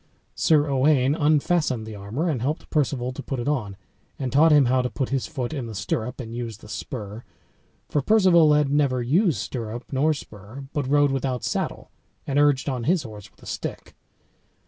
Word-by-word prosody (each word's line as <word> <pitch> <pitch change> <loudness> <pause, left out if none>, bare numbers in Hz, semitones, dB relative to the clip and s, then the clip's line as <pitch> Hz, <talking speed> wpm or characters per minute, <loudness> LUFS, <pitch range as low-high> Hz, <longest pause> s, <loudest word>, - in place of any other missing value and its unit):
Sir 150 -2 +3
Owain 135 0 +3
unfastened 150 -5 +1
the 110 - -8
armor, 105 - -3
and 140 -8 -1
helped 145 +6 -3
Perceval 135 -4 0
to 130 - -7
put 135 -2 -4
it 120 - -4
on, 110 -10 -2 0.4
and 130 -3 -3
taught 155 +4 +6
him 145 -3 +6
how 130 +1 +2
to 125 - -2
put 120 +3 -3
his 135 -2 -1
foot 135 -3 -4
in 135 -6 -4
the 110 - -7
stirrup, 110 +6 -3
and 115 -3 -6
use 115 -3 -5
the 105 - -15
spur; 105 0 -6 0.6
for 145 - 0
Perceval 170 -4 +5
had 150 -2 +2
never 140 -4 +2
used 165 - +2
stirrup 120 -1 -5
nor 150 +3 +2
spur, 110 +1 -10
but 145 -4 -1
rode 145 0 +4
without 130 -2 -2
saddle, - - -3 0.3
and 140 +1 0
urged 145 -2 +3
on 125 -4 -2
his 170 -1 +2
horse 105 -4 -10
with - - -25
a - - -12
stick. - - -6
135 Hz, 190 wpm, -24 LUFS, 120-150 Hz, 0.6 s, taught